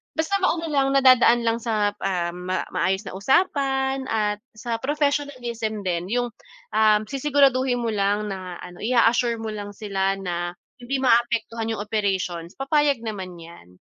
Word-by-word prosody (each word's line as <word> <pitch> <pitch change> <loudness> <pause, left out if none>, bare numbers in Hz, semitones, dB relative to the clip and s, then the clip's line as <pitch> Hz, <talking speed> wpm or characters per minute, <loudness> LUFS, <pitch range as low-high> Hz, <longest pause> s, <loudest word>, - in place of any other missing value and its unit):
basta 365 +5 0
ma-ano 330 -4 0
lang 275 -1 +2
nadadaan 255 -3 +6
lang 230 0 +1
sa, 215 -3 0
um, 180 -1 -2
ma 185 0 0
maayos 190 +4 0
na - - -7
usapan 270 - +1
at 210 -1 0 0.2
sa 230 +1 -3
professionalism 255 -7 -2
din 175 -1 -2
yung, 245 +2 -1 0.4
um, 215 0 +4
sisiguraduhin 265 -1 +2
mo 230 - 0
lang 205 0 0
na 185 -2 -6
ano, 175 0 -10
i-a-assure 235 +1 +3
mo 225 -1 -5
lang 205 -1 -7
sila 195 -2 -1
na 175 -2 -4 0.2
hindi 250 +3 -2
maapektuhan 230 -2 +1
'yong 220 -2 -2
operations 190 -5 -2
papayag 280 -2 +1
naman 190 -5 -5
'yan, 165 - -13
225 Hz, 150 wpm, -24 LUFS, 195-265 Hz, 0.4 s, nadadaan